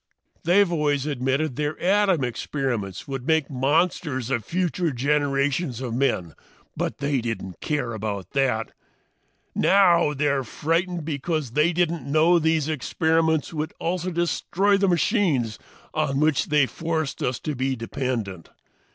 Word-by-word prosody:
"They've 180 +2 +4
always 145 -4 +1
admitted 135 0 -1
their 150 0 -2
atom 190 -4 +3
experiments 120 -5 -3
would 135 -2 -5
make 160 -3 +2
monsters 140 -1 0
of 120 -4 0
future 175 - -1
generations 140 0 0
of 125 -3 -4
men, 105 - 0 0.4
but - - -2
they 140 -2 0
didn't 95 -6 -5
care 145 -6 -1
about 105 -3 -4
that! 125 -5 0 0.8
Now 175 -6 +4
they're 140 -1 +1
frightened 165 +6 -1
because 155 -2 -2
they 150 +6 +3
didn't 165 -5 -1
know 165 +3 +5
these 160 -2 +1
experiments 160 +1 +1
would 155 0 -3
also 180 +1 -1
destroy 180 +3 +1
the 195 0 +2
machines 165 - +1 0.3
on 145 -3 0
which 155 -2 +2
they 150 -1 +3
had 130 - +1
forced 160 -3 -2
us 125 0 -1
to 150 - -3
be 130 0 -1
dependent. 115 - -4
150 Hz, 135 wpm, -24 LUFS, 130-165 Hz, 0.8 s, know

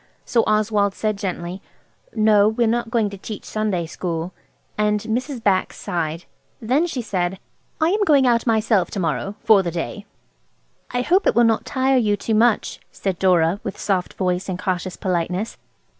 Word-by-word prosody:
So 230 -2 +2
Oswald 210 -2 +2
said 215 -1 -1
gently– 185 -1 -5 0.5
"No, 215 -2 +5
we 220 +2 0
are 225 0 +2
not 240 -1 -3
going 225 -3 +1
to 200 - -9
teach 215 +2 -7
Sunday 210 -6 -1
school." 165 +1 -4 0.5
Mrs. 220 +5 -1
Bax 190 -2 +1
sighed. 165 -1 -3 0.3
Then 265 +9 +1
she 260 -7 -4
said– 190 -3 -2 0.4
"I 320 +1 +3
am 410 +3 +2
going 285 -8 +4
out 235 -1 +2
myself 220 -4 +2
to 200 - -4
morrow–for 195 +5 +2
the 175 - -2
day." 175 +5 -5 0.8
"I 245 0 -1
hope 370 +8 +2
it - - +3
will 240 - +5
not 225 -1 +2
tire 265 0 +1
you 210 -4 +2
too 225 - -2
much," 225 +1 +2
said 190 -3 -3
Dora, 180 0 +3
with 200 - -5
soft 185 -3 -1
voiced 180 0 -1
and 185 - -2
cautious 185 -1 -2
politeness. 180 +3 -2
210 Hz, 170 wpm, -21 LUFS, 185-230 Hz, 0.8 s, No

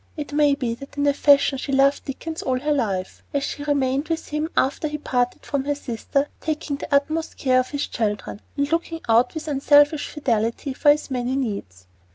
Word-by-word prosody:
It 295 -1 -5
may 290 -1 +4
be 250 -4 -2
that 275 +4 -11
in 285 - +1
a 285 - +4
fashion 280 -1 +4
she 275 - -4
loved 275 +1 +3
Dickens 320 +4 -5
all 255 -1 0
her 300 +3 -1
life, 200 -10 -1
as 280 - +1
she 285 - -4
remained 280 0 +1
with 325 -1 -3
him 300 +2 -2
after 280 +3 +1
he 300 0 -3
parted 245 -4 -1
from 280 -2 -2
her 290 0 0
sister, 275 +2 -2
taking 305 -2 -3
the - - -8
utmost 310 +3 0
care 255 -2 +3
of 255 - -1
his 285 -1 -2
children, 210 -2 -3 0.2
and 285 +1 0
looking 330 0 -1
out 235 +6 +3
with 315 0 -5
unselfish 290 +1 +4
fidelity 235 -1 -1
for 290 +2 +3
his 290 -1 +3
many 250 0 -1
needs. 200 - -4
280 Hz, 205 wpm, -23 LUFS, 255-295 Hz, 0.2 s, may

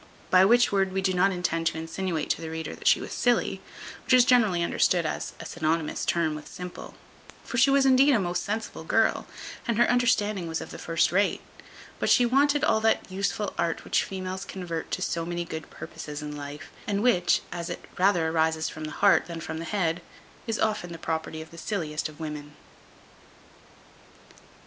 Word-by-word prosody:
By 185 0 +7
which 240 +4 +5
word 195 -1 +1
we 190 - 0
do 190 -1 +2
not 190 +2 +3
intend 165 -2 -1
to 160 - -1
insinuate 165 0 -2
to - - -1
the 160 - -5
reader, 160 0 -5
that - - -5
she - - +6
was - - -6
silly, 245 -1 +1 0.4
which 255 - +4
is 250 -1 +6
generally 215 -9 +4
understood 170 0 +2
as - - -3
a - - -8
synonymous 160 -1 -1
term 170 -3 +1
with 150 -1 -8
simple; 180 0 -8 0.5
for 240 - -2
she 265 - +6
was 275 0 +4
indeed 270 +2 +6
a - - +3
most 180 -2 -1
sensible 220 +2 -4
girl, - - +1 0.4
and 235 -2 0
her 240 - +5
understanding 210 -6 +2
was 160 0 -2
of - - -8
the - - -8
first 165 -1 +1
rate; 200 +3 +2 0.6
but - - 0
she 245 - +5
wanted 285 +4 +3
all 220 - +3
that 220 -3 +1
useful 200 +2 -2
art 165 -1 -1
which - - +1
females 190 0 -5
convert 170 -4 -5
to - - -2
so 170 - -1
many 175 0 -3
good 160 -1 -7
purposes 150 0 -8
in 150 0 -5
life, 145 +1 -8 0.2
and 205 0 0
which, 225 -8 +3
as 170 +1 -4
it 175 - -6
rather 180 -4 +3
arises 160 0 +1
from 155 - -7
the 155 - -5
heart 200 - +5
than 170 -1 -6
from 160 0 -5
the 165 - -5
head, 170 -1 -1 0.5
is 225 -1 -1
often 210 -5 -1
the - - -7
property 160 -1 -3
of 160 - -18
the 170 - -11
silliest 155 -7 -3
of 155 - -15
women. 150 -2 -6
175 Hz, 195 wpm, -27 LUFS, 160-210 Hz, 0.6 s, By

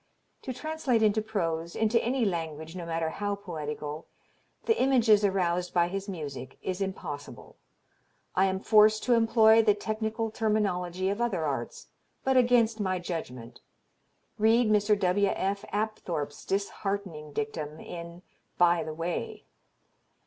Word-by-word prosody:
To 260 - -5
translate 270 -4 0
into 215 0 +3
prose, 170 -6 -2
into 225 +1 +2
any 245 0 +1
language 160 -3 -3
no 175 -2 -6
matter 165 -1 -1
how 205 +2 -2
poetical, 155 -5 -6 0.6
the 450 - +2
images 235 -6 +4
aroused 180 -3 0
by 175 0 +3
his 195 +2 -4
music, 145 -7 -6
is 185 +1 -3
impossible. 165 -7 -6 0.8
I 190 - +3
am 190 0 -1
forced 215 0 +5
to 250 - +3
employ 225 -1 +5
the 210 -2 +3
technical 220 +1 -3
terminology 190 -5 0
of 205 +4 -3
other 195 -9 0
arts, 135 -5 -4 0.3
but 265 0 +2
against 240 -3 +4
my 185 -2 0
judgment. 125 -9 -6 0.8
Read 225 +1 +4
Mr. 210 0 +3
W. 200 +1 +2
F. 195 +1 -1
Apthorp's 180 -9 -3
disheartening 195 -5 -3
dictum 155 -6 -4
in 170 +1 -9 0.3
"By 175 -1 +4
the 155 - -6
Way." 165 +1 -4
195 Hz, 135 wpm, -28 LUFS, 170-220 Hz, 0.8 s, forced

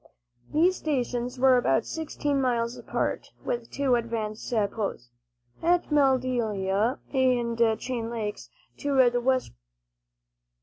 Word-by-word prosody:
These 350 +5 +3
stations 250 -4 -2
were 260 0 +6
about 135 - +2
sixteen 295 -3 -2
miles 235 -2 0
apart, - - -2 0.2
with 235 -1 -3
two 275 -2 0
advanced 225 -2 -2
posts, 205 - -2 0.5
at 345 0 +2
Madelia 245 -6 +1 0.2
and 235 -4 +2
Chain 235 -3 -3
Lakes, 215 -3 -4 0.3
to 275 -3 +3
the 245 0 0
westward. 260 +1 0
245 Hz, 105 wpm, -27 LUFS, 230-265 Hz, 0.5 s, were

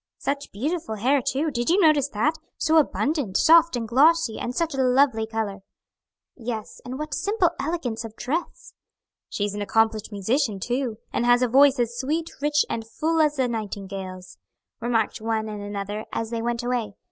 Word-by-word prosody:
"Such 280 0 -3
beautiful 280 - -3
hair 260 +6 +2
too; 290 +5 -1
did 240 0 -1
you 360 +4 +4
notice 305 -6 +4
that? 260 +9 +1 0.2
so 320 0 +2
abundant, 290 - +1
soft 335 -1 +6
and 230 -2 -3
glossy, 285 0 +3
and 245 - -4
such 330 +1 0
a 270 - 0
lovely 255 -3 +3
color." 220 -3 -3 0.8
"Yes, 225 -3 -6
and 255 +1 -6
what 305 -1 -5
simple 405 -1 +1
elegance 280 -8 -2
of 225 -1 -9
dress." 320 +10 -4 0.6
"She's 205 -1 -2
an 205 - -4
accomplished 220 +1 +1
musician, 210 +2 0
too, 245 +1 -2 0.2
and - - 0
has 245 +1 +5
a - - +3
voice 275 +3 +5
as 240 0 -1
sweet, 315 +5 -2
rich, 295 0 +2
and 225 - -3
full 320 +5 0
as 300 -1 +2
a 260 -2 +2
nightingale's," 195 -4 -6 0.4
remarked 225 -2 0
one 220 -1 -1
and 210 -1 -6
another 205 +1 -5
as 225 0 -3
they 230 -1 -2
went 235 0 -2
away. 240 -5 -2
245 Hz, 175 wpm, -24 LUFS, 220-295 Hz, 0.8 s, soft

